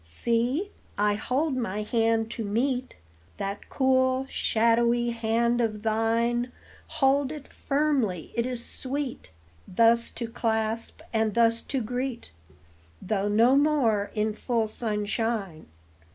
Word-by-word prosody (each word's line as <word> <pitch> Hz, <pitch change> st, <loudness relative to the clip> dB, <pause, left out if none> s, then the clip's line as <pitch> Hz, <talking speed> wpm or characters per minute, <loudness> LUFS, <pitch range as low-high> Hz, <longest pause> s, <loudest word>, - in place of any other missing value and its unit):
See, 235 Hz, -, 0 dB, 0.3 s
I 205 Hz, 0 st, +3 dB
hold 265 Hz, +7 st, -1 dB
my 210 Hz, -4 st, -2 dB
hand 225 Hz, 0 st, +1 dB
to 230 Hz, -, -4 dB
meet 250 Hz, +5 st, -1 dB, 0.4 s
That 200 Hz, +1 st, -5 dB
cool, 260 Hz, 0 st, +2 dB
shadowy 235 Hz, +1 st, +2 dB
hand 235 Hz, +1 st, +1 dB
of 215 Hz, -2 st, -2 dB
thine; 230 Hz, +2 st, +1 dB, 0.4 s
Hold 280 Hz, -2 st, +2 dB
it 300 Hz, -2 st, -8 dB
firmly, 275 Hz, -, -1 dB
it 235 Hz, +1 st, 0 dB
is 245 Hz, -2 st, -4 dB
sweet 270 Hz, -, -5 dB, 0.4 s
Thus 230 Hz, +4 st, +3 dB
to 235 Hz, -, -5 dB
clasp 225 Hz, 0 st, -2 dB
and 220 Hz, -2 st, +1 dB
thus 230 Hz, 0 st, +3 dB
to 265 Hz, -3 st, -3 dB
greet, 245 Hz, -, -4 dB, 0.7 s
Though 200 Hz, 0 st, -1 dB
no 230 Hz, +5 st, +4 dB
more 260 Hz, -9 st, +2 dB
in 215 Hz, 0 st, 0 dB
full 230 Hz, 0 st, -1 dB
sunshine. 210 Hz, -4 st, -2 dB
230 Hz, 120 wpm, -27 LUFS, 220-255 Hz, 0.7 s, no